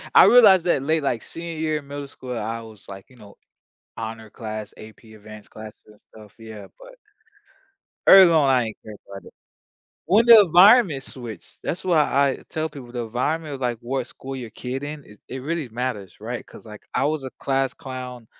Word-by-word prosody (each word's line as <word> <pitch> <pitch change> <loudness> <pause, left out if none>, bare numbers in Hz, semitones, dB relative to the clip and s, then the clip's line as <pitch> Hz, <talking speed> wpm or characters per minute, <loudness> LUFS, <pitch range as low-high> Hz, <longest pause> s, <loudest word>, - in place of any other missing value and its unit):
I - - +9
realized 200 -8 +7
that 155 -6 +1
late, 155 0 0
like, 120 -4 -1
senior 165 0 -8
year 155 -1 0
in 140 - -17
middle 140 0 -7
school, 125 -2 -8
I 115 +1 -4
was 110 -3 -14
like 95 +3 -11
you 130 - -20
know, 105 -3 -16 0.6
honor 110 -1 -7
class, 110 -2 -7
AP 110 +1 -14
advanced 110 0 -13
classes 110 -1 -12
and 105 -1 -19
stuff, 105 -2 -18
yeah, 110 -3 -11
but - - -15 1.1
early 190 -3 +9
on, 150 -4 +3
I 130 -2 +3
ain't 110 - -8
care 110 -1 -10
about 100 0 -10
it. - - -15 0.7
When 215 +7 +3
the 230 -2 +10
environment 180 - +5
switched, 115 -8 -11
that's 175 - -4
why 175 -4 +2
I 140 -2 +1
tell 160 0 -3
people, 135 -6 -12
"The 120 -2 -4
environment 145 +6 -3
of, 135 - -8
like, 120 -2 -2
what 130 +1 -3
school 135 0 -9
your 120 -4 -7
kid 130 +4 -6
in, 145 0 -7
it 105 - -18
it 130 - -6
really 160 -3 -3
matters." 110 -6 -5
Right, 120 +3 -6
'cause, - - -15
like, 105 -1 -12
I - - +1
was 150 -1 -1
a 130 - -6
class 135 -1 -1
clown 125 -3 -9
130 Hz, 200 wpm, -22 LUFS, 110-155 Hz, 1.1 s, the